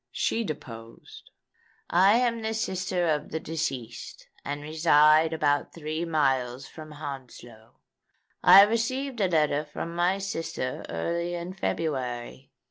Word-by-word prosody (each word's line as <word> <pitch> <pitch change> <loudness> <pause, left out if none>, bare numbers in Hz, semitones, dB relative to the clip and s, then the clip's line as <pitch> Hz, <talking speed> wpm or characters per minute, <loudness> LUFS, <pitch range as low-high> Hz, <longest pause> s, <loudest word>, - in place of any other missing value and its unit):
She 230 - -1
deposed: 115 - -9 0.6
"I 190 +4 +5
am 235 -1 +1
the 220 0 -2
sister 185 -4 -1
of 150 -2 -1
the 160 - -3
deceased, 150 -8 -5 0.2
and 145 +1 -5
reside 155 0 +4
about 145 -3 0
three 155 +1 -3
miles 135 -5 0
from 155 -1 -11
Hounslow. 125 -6 -10 0.7
I 190 +2 +10
received 240 +3 -1
a 195 - +3
letter 150 -3 +1
from 155 +2 -6
my 175 +3 +2
sister 165 -9 -4
early 170 - -2
in 175 +2 -5
February. 130 - -3
155 Hz, 125 wpm, -27 LUFS, 140-180 Hz, 0.7 s, I